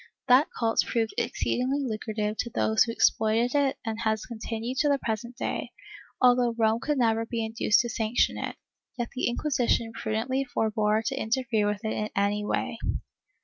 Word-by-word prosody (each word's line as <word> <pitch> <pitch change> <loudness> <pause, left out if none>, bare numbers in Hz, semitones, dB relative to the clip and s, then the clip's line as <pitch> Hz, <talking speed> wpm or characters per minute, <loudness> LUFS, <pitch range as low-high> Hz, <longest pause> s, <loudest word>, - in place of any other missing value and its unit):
That 260 +4 +6
cult 225 -1 0
proved 225 -2 -1
exceedingly 255 +3 -1
lucrative 215 -3 -2
to 235 - -2
those 220 -1 +3
who 230 - -3
exploited 225 +1 +2
it 280 -2 +2
and 225 0 -3
has 220 -2 0
continued 230 +2 -4
to 295 - +3
the 285 - +3
present 235 0 -4
day, - - -3 0.5
although 245 -2 +4
Rome 225 0 +2
could 295 +3 -1
never 225 -2 +2
be 230 -1 -3
induced 220 -1 +2
to 240 - -4
sanction 225 +1 +1
it, - - -4 0.4
yet 240 -1 -2
the 260 - -1
Inquisition 240 -3 0
prudently 235 +5 -1
forbore 220 -3 0
to 270 - -1
interfere 235 -3 0
with 210 +1 -2
it 220 - 0
in 215 0 -2
any 205 +1 +1
way. - - -2
230 Hz, 170 wpm, -27 LUFS, 220-250 Hz, 0.5 s, That